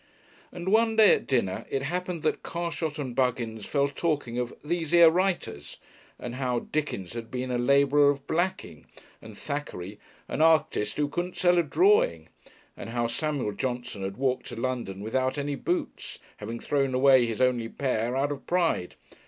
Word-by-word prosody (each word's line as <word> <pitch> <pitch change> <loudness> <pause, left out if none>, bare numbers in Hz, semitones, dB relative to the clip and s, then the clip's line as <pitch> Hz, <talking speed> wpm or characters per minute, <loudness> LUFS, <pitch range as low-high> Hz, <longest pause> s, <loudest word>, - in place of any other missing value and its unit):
And 175 +1 -4
one 225 +2 +3
day 220 -2 +7
at - - -1
dinner 120 -8 -1
it 135 - -2
happened 180 +2 -3
that 155 - 0
Carshot 170 -2 -3
and 130 -5 -5
Buggins 120 -4 -1
fell 140 -1 +1
talking 140 -6 -2
of 125 -1 -2
"these 165 0 -2
here 170 -1 +7
writers," 175 - -2 0.4
and 120 - -6
how 125 -3 -1
Dickens 145 -12 -3
had 115 -1 -6
been 125 0 -4
a 120 - 0
labeller 140 +3 +4
of 140 -1 -2
blacking 175 - -2 0.3
and 110 -2 -12
Thackeray 105 -10 -5 0.3
"an - - -2
artist 155 -10 +2
who 150 -1 +1
couldn't 175 +4 -4
sell 175 -1 +4
a - - +3
drawing," 420 - +2 0.5
and - - -8
how 120 0 -1
Samuel 140 -1 -2
Johnson 120 -1 -4
had 95 +1 -4
walked 130 -1 -1
to - - -7
London 115 -5 -3
without 130 +6 -1
any 145 0 -2
boots, 175 +5 -3 0.2
having 115 +3 -6
thrown 135 -3 0
away 130 -2 +5
his 115 -2 -4
only 125 -3 +1
pair 125 -2 -1
"out 140 +2 0
of 140 - -7
pride." 170 - 0
135 Hz, 170 wpm, -27 LUFS, 120-160 Hz, 0.5 s, day